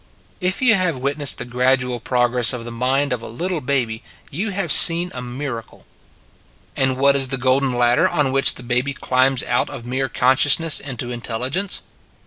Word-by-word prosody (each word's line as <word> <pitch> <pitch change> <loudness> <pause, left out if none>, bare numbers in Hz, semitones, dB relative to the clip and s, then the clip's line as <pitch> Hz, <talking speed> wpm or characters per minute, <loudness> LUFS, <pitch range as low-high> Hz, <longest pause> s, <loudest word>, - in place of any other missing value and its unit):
If 185 +5 -2
you 240 -3 +6
have 180 -7 0
witnessed 140 +2 0
the - - -6
gradual 125 0 -1
prog 125 0 -1
ress 125 0 +4
of 120 -2 -7
the 120 - -8
mind 130 +3 -1
of 120 - -5
a - - -9
little 170 +8 -4
baby, 125 -4 -2 0.3
you 195 +10 -4
have 195 -5 -2
seen 175 +1 +6
a 125 - -6
miracle. 125 -1 -8 0.9
And 130 -1 -1
what 140 +1 +4
is 135 -1 +1
the 135 +1 -2
golden 130 +1 0
ladder 120 0 +2
on 145 -3 -1
which 135 +1 +4
the 125 - -11
baby 125 +3 -2
climbs 130 0 0
out 120 -2 -1
of 120 - -9
mere 130 +2 -3
consciousness 140 +5 +3
into 125 -3 -7
intelligence? 125 - -4
130 Hz, 180 wpm, -19 LUFS, 125-145 Hz, 0.9 s, you